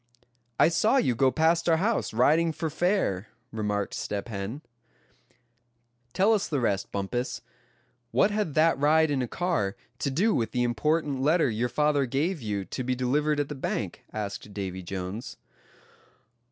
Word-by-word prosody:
"I - - +6
saw 215 +10 +3
you 130 - +2
go 130 +3 +3
past 165 +4 +2
our 165 - +4
house, 215 +7 0
riding 155 +8 +3
for 160 +1 -3
fair," 160 - 0 0.2
remarked 105 -2 -2
Step 100 +2 -4
Hen. 110 +7 -5 1.5
"Tell 195 - +3
us 205 -3 +1
the 145 -4 -1
rest, 100 -5 -1
Bumpus; 100 +6 -3 0.7
what 200 - +3
had 205 -8 -1
that 160 -1 +4
ride 155 +2 +4
in 135 -2 +1
a 125 - -1
car 165 - -1 0.2
to 140 - 0
do 190 +11 +2
with 115 - -1
the 125 - +1
important 140 +4 0
letter 155 -1 +3
your 115 +3 -1
father 145 +1 +2
gave 150 +6 -1
you 100 -3 -3
to 130 - -4
be 130 +1 0
delivered 145 +4 +1
at 145 - 0
the - - -3
bank?" 135 - -4
asked 105 -1 -5
Davy 95 -2 -4
Jones. 95 +4 -6
135 Hz, 160 wpm, -27 LUFS, 110-160 Hz, 1.5 s, I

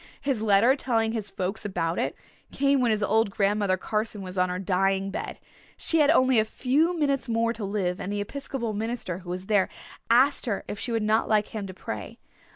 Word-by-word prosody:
His 270 -6 -1
letter, 220 +4 +5
telling 225 -5 0
his 220 -3 -3
folks 195 +2 -3
about 170 -4 -2
it, - - -1 0.4
came 275 -1 +2
when 245 - +3
his 215 -1 +1
old 220 +1 +2
Grandmother 200 -1 +1
Carson 210 +1 -3
was 185 0 -7
on 180 -1 +2
her 180 - -2
dying 195 +1 0
bed. 200 - -5 0.4
She 325 - +1
had 295 -1 +5
only 260 -6 +5
a - - +4
few 290 +10 +1
minutes 275 -5 0
more 230 0 +1
to 230 - -7
live 195 -3 -2
and 195 - -4
the 205 - -2
Episcopal 235 +1 -4
minister, 215 -4 -3
who 180 -2 -11
was 180 +1 -4
there, 200 -2 +2 0.4
asked 260 +3 +4
her 205 -4 -1
if 205 - -5
she 245 - -4
would 225 -2 0
not 215 +1 +2
like 215 -1 +2
him 210 -3 -5
to 185 - -8
pray. 110 - -6
215 Hz, 210 wpm, -26 LUFS, 195-240 Hz, 0.4 s, letter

